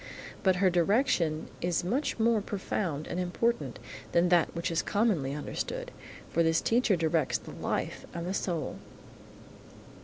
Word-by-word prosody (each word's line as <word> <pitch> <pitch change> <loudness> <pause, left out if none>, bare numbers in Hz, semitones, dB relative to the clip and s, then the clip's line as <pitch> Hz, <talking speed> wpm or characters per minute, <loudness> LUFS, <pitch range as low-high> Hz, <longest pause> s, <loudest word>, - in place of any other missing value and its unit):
But 190 -2 +4
her 185 0 +3
direction 175 - +2
is 175 -1 0
much 250 +11 0
more 225 -1 +3
profound 185 -6 -2
and 175 - -3
important 230 +7 0 0.4
than 170 +1 +4
that 175 -2 +3
which 170 0 -1
is 165 - +1
commonly 190 - +1
understood, 150 - -4 0.4
for 170 - +1
this 165 0 +3
teacher 230 -3 +3
directs 165 -1 +1
the - - -11
life - - -3
and 170 0 -5
the 185 - -2
soul. 170 -7 -2
175 Hz, 145 wpm, -30 LUFS, 165-205 Hz, 0.4 s, But